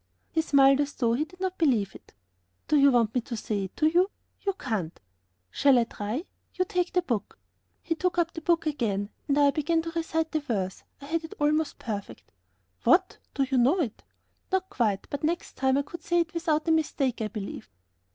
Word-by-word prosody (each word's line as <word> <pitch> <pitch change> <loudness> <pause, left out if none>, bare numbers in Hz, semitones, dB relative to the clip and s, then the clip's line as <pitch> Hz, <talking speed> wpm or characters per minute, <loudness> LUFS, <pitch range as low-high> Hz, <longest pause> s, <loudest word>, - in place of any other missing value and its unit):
He 320 - +2
smiled 275 -2 +5
as 290 0 -2
though 235 -3 +1
he 285 +6 0
did 365 +3 -18
not 375 0 -3
believe 240 - +2
it. - - -16 0.5
"Do - - +2
you 280 -1 +7
want 235 -4 +3
me 250 - +1
to 235 0 -6
say 205 -2 -2
it 190 - -12
to 305 - +2
you?" 350 +5 +4 0.3
"You 395 - 0
can't." 215 - -3 0.5
"Shall 275 - +4
I 240 - +5
try? 230 - -4 0.3
You 370 - +1
take 360 0 -1
the 360 - +2
book." 230 - -3 0.5
He 330 - 0
took 355 +2 -1
up 335 -1 +1
the 325 - -6
book 335 0 +2
again, 215 -9 -1 0.2
and 280 - +2
I 285 -1 +5
began 325 +3 0
to 330 - -4
recite 325 -1 -1
the 310 - +1
verse. 205 -10 -3 0.2
I - - -9
had 325 +3 -1
it 320 - -9
almost 305 +1 +1
perfect. 205 -3 -6 0.5
"What! 370 +1 +3 0.2
you 265 -2 +2
know 275 +10 +4
it?" 250 -10 -2 0.5
"Not 380 0 0
quite, 210 -6 0
but 285 - -4
next 335 +3 -1
time 265 0 +2
I 280 - +1
could 335 +4 -9
say 345 +2 +2
it 330 -1 -4
without 325 -2 0
a - - +4
mistake, 280 -6 +1
I 215 - 0
believe." 210 - -7
290 Hz, 210 wpm, -27 LUFS, 235-330 Hz, 0.5 s, you